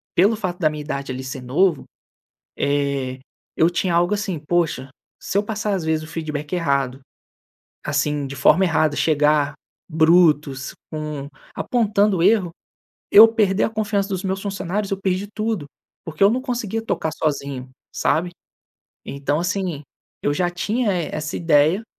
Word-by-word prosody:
pelo 200 +6 +4
fato 185 -4 -4
da 155 -3 +3
minha 150 0 -6
idade 140 -3 -4
ali 130 +1 -5
ser 130 0 -6
novo, 155 +6 +1 0.7
eh, 140 -2 -1 0.4
eu 165 - +4
tinha 175 0 -1
algo 175 +4 +3
assim: 200 -5 -3
"Poxa, 150 -4 -1 0.3
se - - -4
eu - - +2
passar, 210 -1 -2
as 180 -4 -2
vezes, 160 -1 0
o - - -12
feedback 150 -2 -5
errado, 140 -6 0 0.9
assim, 145 -1 0
de 140 - -7
forma 150 +6 +4
errada. 155 -3 +1
Chegar 150 -2 +2 0.4
brutos, 155 -4 +3 0.2
com 150 -3 -5 0.3
apontando 205 -6 +1
erro 195 -4 +3 0.6
eu 220 +2 +10
perder 210 -4 +1
a - - 0
confiança 210 -2 -1
dos 190 0 -3
meus 190 0 -1
funcionários, 200 0 -3
eu 195 - 0
perdi 190 +1 -1
tudo, 215 -8 -2 0.4
porque 160 +3 -5
eu 200 - +6
não 250 - 0
conseguia 230 -4 -3
tocar 160 -7 -2
sozinho, 140 -4 -3 0.2
sabe. 175 +3 +1 0.8
Então, 145 +2 -2
assim, 175 -4 -2 0.4
eu 145 - +1
já 175 +3 0
tinha 210 +6 -1
e 170 -3 -1
essa 155 0 -4
ideia. 165 +5 +3
165 Hz, 155 wpm, -21 LUFS, 145-200 Hz, 0.9 s, eu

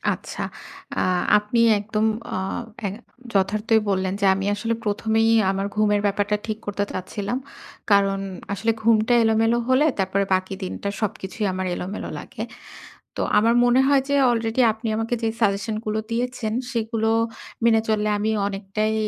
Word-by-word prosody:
আচ্ছা। - - -6 0.5
আ - - +1 0.4
আপনি 210 +3 -2 0.2
একদম 215 +1 -1 0.3
আ - - -1 0.5
এ - - 0 0.4
যথার্থই 210 +3 +2
বললেন 190 -1 0
যে, - - 0
আমি 195 0 -3
আসলে 225 +2 -1
১ম 210 +2 -2
এই 225 - +4 0.2
আমার 195 +1 -1
ঘুমের 210 -1 +3
ব্যাপারটা 205 +1 +1
ঠিক 215 -1 -3
করতে 205 0 -1
চাচ্ছিলাম 200 +5 -3 0.5
কারণ 195 -1 +4 0.3
আসলে 225 +3 +1
ঘুমটা 225 +1 +3
এলোমেলো 225 +1 +3
হলে 260 +4 +4
তারপরে 195 +1 +1
বাকি 185 +1 -1
দিনটা 190 +2 -4
সবকিছুই 210 0 -3
আমার 185 0 -3
এলোমেলো 190 +4 -5
লাগে। - - -10 0.8
তো - - -3 0.2
আমার 230 +3 +4
মনে 245 +2 +4
হয় 280 -1 +5
যে, 280 - +1 0.2
already 230 +1 0
আপনি 225 +1 -6
আমাকে 225 +2 -1
যে, - - +1
suggestion 205 +1 +1
গুলো 215 0 -1
দিয়েছেন 240 -2 -2 0.2
সেগুলো 225 -1 -1 0.6
মেনে 225 -1 +5
চললে 215 -1 +1
আমি 215 +1 0 0.2
অনেকটাই 205 +2 -2
215 Hz, 150 wpm, -23 LUFS, 200-225 Hz, 0.8 s, হয়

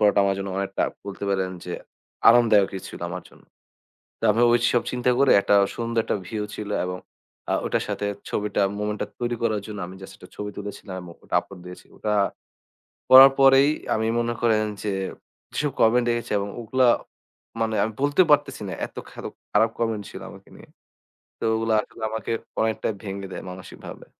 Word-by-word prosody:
পরাটা 105 -1 +4
আমার 100 - +2
জন্য 100 0 -4
অনেকটা 100 0 -1 0.2
বলেতে 100 0 -6
পারেন 95 -1 0
যে 90 - -5 0.6
আনন্দদায়কই 110 -5 +5
ছিল - - -10
আমার - - -5
জন্য। - - -20 0.8
তো - - -16
আমি 115 +3 +1
ওইসব 120 0 +3
চিন্তা 125 0 0
করে, 140 -1 +5
একটা 100 - +3 0.2
সুন্দর 115 0 -1
একটা - - -1
ভিউ 105 +3 -3
ছিল 105 -1 -6 0.2
এবং 90 0 -4 0.5
আ - - +2
ওইটার - - 0
সাথে 100 - -2 0.2
ছবিটা, 105 0 -1 0.2
মোমেন্টটা 105 0 -2
তৈরি 120 0 -1
করার 110 -3 +1
জন্য 105 -1 -6
আমি 95 - -10
just 95 0 -10
একটা 90 - -14
ছবি 105 0 -5
তুলেছিলাম 100 -1 -7
এবং 85 -1 -10
ওটা - - -3
আপলোড 100 -2 -13
দিয়েছিলাম। 90 0 -12
ওটা 105 -1 -1 1.0
করার 135 +1 +11
পরেই 135 +1 +7 0.3
আমি 110 0 0
মনে 120 0 0
করেন 110 -2 +3 0.2
যে, 105 - -1 0.6
যেসব 150 -2 -1
কমেন্ট 120 +2 +4
দেখেছি, 120 0 -2
এবং 100 - -3
ওগুলা 125 +3 +2 0.7
মানে 110 -1 0
আমি 110 - -3
বলতে 145 +5 +4
পারতেছি 145 -5 +3
না - - -4
এত - - -22
খার - - -10 0.3
খারাপ 115 - +4
কমেন্ট 115 -3 -1
ছিল - - -9
আমাকে - - -15
নিয়ে। - - -15 0.7
তো - - -6
ওগুলা 115 0 0
এখন - - -15
আসলে 115 - -9
আমাকে 110 0 -4 0.3
অনেকটাই 110 0 0
ভেঙে 100 -1 -5
দেয় - - -6
মানসিকভাবে। 95 +1 -10
110 Hz, 180 wpm, -24 LUFS, 100-120 Hz, 1.0 s, করার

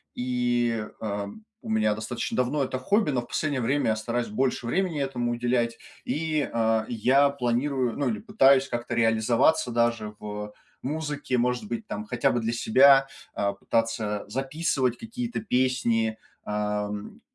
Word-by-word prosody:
и, 120 -2 0
а, 105 -2 -3
м, 215 - -11 0.2
у - - -8
меня 110 -1 +2
достаточно 110 +3 -4
давно 130 +3 +1
это 130 0 -3
хобби, 200 - +2
но 125 -3 0
в 120 - -12
последнее 145 -4 -1
время 140 +5 +1
я - - +1
стараюсь 115 +2 -2
больше 125 +2 -1
времени 170 +4 0
этому 125 -3 -1
уделять, 120 -1 0 0.3
и, 150 +1 -1
а, 110 -1 +1
я 130 +5 +4
планирую, 125 -1 0
ну, 145 - 0
или 220 - -1
пытаюсь 140 - +4
как-то 120 0 -3
реализоваться 115 +6 +3
даже 115 -2 0
в, 105 0 -5
э, - - -14 0.3
музыке, 145 -2 -2
может 125 - 0
быть, 225 0 -4
там, 215 - -5
хотя 140 -9 +1
бы 120 - 0
для 115 0 -1
себя, 135 +4 +6 0.3
а, 100 0 0
пытаться 105 0 -1
записывать 135 0 -1
какие-то 235 +1 -4
песни, 125 - +1 0.3
ам, 105 0 -3
120 Hz, 155 wpm, -26 LUFS, 115-140 Hz, 0.3 s, себя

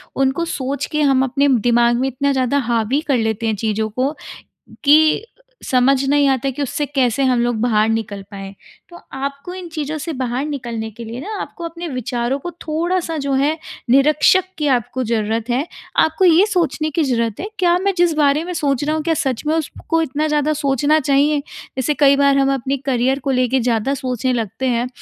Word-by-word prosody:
उनको 270 +5 +1
सोच 280 -3 -3
के 305 - 0
हम 270 -2 +3
अपने 275 +2 +1 0.2
दिमाग 240 0 +4
में 265 - +1
इतना 275 +2 0
ज़्यादा 260 +1 +1
हावी 235 +5 +1
कर 275 -4 +2
लेते 220 0 -1
हैं 220 - 0
चीज़ों 215 +1 -1
को 255 +6 -1 0.7
कि, 310 +7 +5 0.4
समझ 265 +1 +2
नहीं 290 0 +4
आता 270 0 +1
कि 275 +2 -4
उससे 290 +2 -2
कैसे 270 -2 0
हम 250 -2 +2
लोग 240 -1 0
बाहर 220 -2 +2
निकल 215 -3 -2
पाएँ? 195 -1 -8 0.3
तो 345 - -13 0.2
आपको 280 +6 -5
इन 365 -2 -7
चीज़ों 310 -1 -4
से 325 +2 -4
बाहर 255 0 -2
निकलने 235 -6 -4
के 230 +2 -10
लिए 230 +2 -7
ना 415 +8 -5
आपको 345 - -9
अपने 335 +1 -6
विचारों 250 -1 -2
को 350 +5 -6
थोड़ा-सा 330 +1 -1
जो 280 -1 -2
है 285 +4 +1 0.3
निरीक्षक 300 +7 +4
की 300 - -1
आपको 245 +2 -2
ज़रूरत 225 0 -1
है। 260 +6 0 0.3
आपको 320 +4 +3
ये 350 +4 +6
सोचने 330 -6 0
की 310 +1 0
ज़रूरत 230 -5 -1
है 405 - -4
क्या 350 -1 +4
मैं 390 +1 0
जिस 345 -2 +3
बारे 295 +1 +2
में 360 - -5
सोच 280 -4 0
रहा 305 +1 0
हूँ, 315 - -2
क्या 330 0 +1
सच 265 -5 -2
में 310 - +2
उसको 325 +1 -1
इतना 305 0 -1
ज़्यादा 300 0 +1
सोचना 290 +1 +1
चाहिए? 285 +1 +2 0.4
जैसे 265 +3 0
कई 280 -1 +4
बार 280 0 +3
हम 275 0 +3
अपने 270 +1 -2
करियर 265 0 0
को 275 - -2
लेके 255 0 +1
ज़्यादा 235 +2 0
सोचने 255 -2 -2
लगते 225 +1 -3
हैं 240 0 0
275 Hz, 200 wpm, -19 LUFS, 245-305 Hz, 0.7 s, ये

